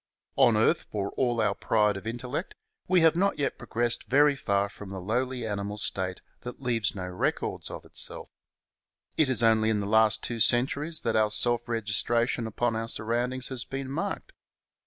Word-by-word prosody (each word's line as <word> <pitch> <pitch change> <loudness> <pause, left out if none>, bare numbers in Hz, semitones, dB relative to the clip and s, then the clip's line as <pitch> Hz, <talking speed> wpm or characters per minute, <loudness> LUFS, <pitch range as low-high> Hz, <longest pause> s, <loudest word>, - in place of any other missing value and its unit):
On - - +5
earth, - - +2
for 100 -1 -2
all 120 -3 0
our 105 -2 +2
pride 105 0 +1
of 95 +3 -7
intellect, 125 - -4 0.3
we 185 -2 +4
have 165 0 +5
not 195 +3 +1
yet 145 - -2
progressed 120 +1 0
very 140 +5 +4
far 100 -6 0
from 100 -1 -11
the 95 0 -6
lowly 125 +5 -2
animal 105 -1 -3
state 95 -3 -2 0.2
that 125 -1 -8
leaves 115 -7 -1
no 90 -2 -5
rec 90 0 -1
ords - - -4
of - - -8
itself. - - -3 0.8
It 155 -4 +3
is 120 -3 +3
only 110 -1 +4
in 110 -2 +1
the 100 - -2
last 110 +1 +3
two 120 -1 -3
centuries 145 +8 +1
that 115 - -1
our 110 -1 +3
self 120 +2 0
registration 115 +2 0
upon 115 +1 -1
our 115 0 -3
surroundings 120 +3 -1
has 130 -3 -2
been 135 0 -6
marked. - - -4
115 Hz, 180 wpm, -27 LUFS, 105-130 Hz, 0.8 s, On